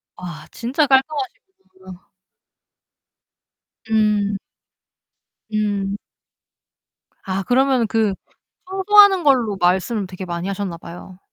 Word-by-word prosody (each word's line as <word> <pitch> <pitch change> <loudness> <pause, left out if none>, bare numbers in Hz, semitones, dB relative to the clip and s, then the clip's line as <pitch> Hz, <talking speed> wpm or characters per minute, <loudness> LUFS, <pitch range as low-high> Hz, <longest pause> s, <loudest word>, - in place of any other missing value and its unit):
와, 170 -3 -9
진짜 260 +6 0
깔끔하시구나. 265 - -3 1.8
음. 210 -2 +1 1.1
음. 205 -2 -1 1.3
아 190 0 -3
그러면은 255 -1 +2
그 220 -3 +1 0.6
청소하는 390 -1 +5
걸로 245 -8 +2
말씀을 190 +4 +1
되게 185 +1 -8
많이 170 +1 -4
하셨나 195 -3 -4
봐요. 180 +2 -12
210 Hz, 185 characters per minute, -20 LUFS, 185-265 Hz, 1.8 s, 청소하는